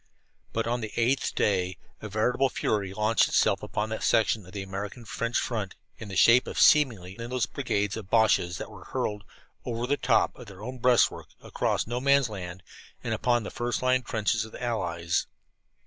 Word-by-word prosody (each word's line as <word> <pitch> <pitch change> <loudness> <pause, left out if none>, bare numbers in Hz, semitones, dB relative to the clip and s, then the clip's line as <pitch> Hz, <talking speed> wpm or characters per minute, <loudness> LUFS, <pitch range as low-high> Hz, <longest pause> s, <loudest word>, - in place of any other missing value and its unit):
But 115 - -1
on 120 +1 -1
the 110 -1 -5
eighth 125 +3 +1
day 95 -3 +1 0.2
a 110 - -6
veritable 120 +6 +1
fury 100 -5 -1
launched 105 +2 +2
itself - - +2
upon 105 +1 -3
that 110 - -4
section 110 -1 +2
of - - -12
the 100 0 -5
American 100 +5 -6
French 115 +2 -2
front, 105 -6 -2 0.2
in 110 - -7
the 100 - -6
shape 120 +5 +6
of - - -4
seemingly 115 - +4
endless 120 +1 -1
brigades 105 -7 -2
of 105 -4 -8
Boches 110 -6 +3
that - - -7
were - - -12
hurled 105 -1 -3 0.4
"over 120 0 -3
the 140 +3 +1
top" - - +2
of 125 - -10
their 100 0 -11
own 125 +2 -6
breastworks, 125 0 +2
across - - -1
No 120 +2 -3
Man's 140 -2 +4
Land, 90 -3 -7 0.4
and - - -2
upon 120 -2 +1
the - - -6
first 120 +1 -2
line 130 0 +3
trenches 110 -1 0
of 110 - -11
the - - -8
Allies. 85 -8 -1
110 Hz, 190 wpm, -27 LUFS, 100-120 Hz, 0.4 s, shape